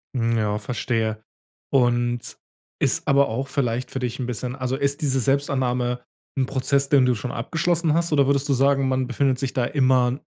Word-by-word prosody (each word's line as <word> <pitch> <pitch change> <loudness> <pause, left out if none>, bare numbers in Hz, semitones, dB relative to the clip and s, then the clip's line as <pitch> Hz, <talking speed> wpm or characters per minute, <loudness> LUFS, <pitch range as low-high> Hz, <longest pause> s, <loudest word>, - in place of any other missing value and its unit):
Mhm, 115 -1 +1
ja, 105 -1 0
verstehe. 110 -1 -2 0.5
Und, 120 -2 +1 0.4
ist - - 0
aber 140 -2 +4
auch 130 +5 -3
vielleicht 130 -3 -1
für 130 - -3
dich 125 0 -3
'n 125 - -2
bisschen 125 +1 -4
also 130 -1 -2
ist 140 +1 -1
diese 135 -2 +1
Selbstannahme 125 -2 0 0.3
'n 130 - +2
Prozess, 140 +1 0
den 135 -3 +5
du 125 -1 +2
schon 120 +4 -5
abgeschlossen 165 +5 0
hast 170 0 0
oder 140 -2 +4
würdest 140 +1 +1
du - - +4
sagen, 135 +1 +2
man 130 -1 0
befindet 130 +1 0
sich 135 -1 -3
da 130 -3 0
immer 130 -1 +2
130 Hz, 185 wpm, -23 LUFS, 120-140 Hz, 0.5 s, den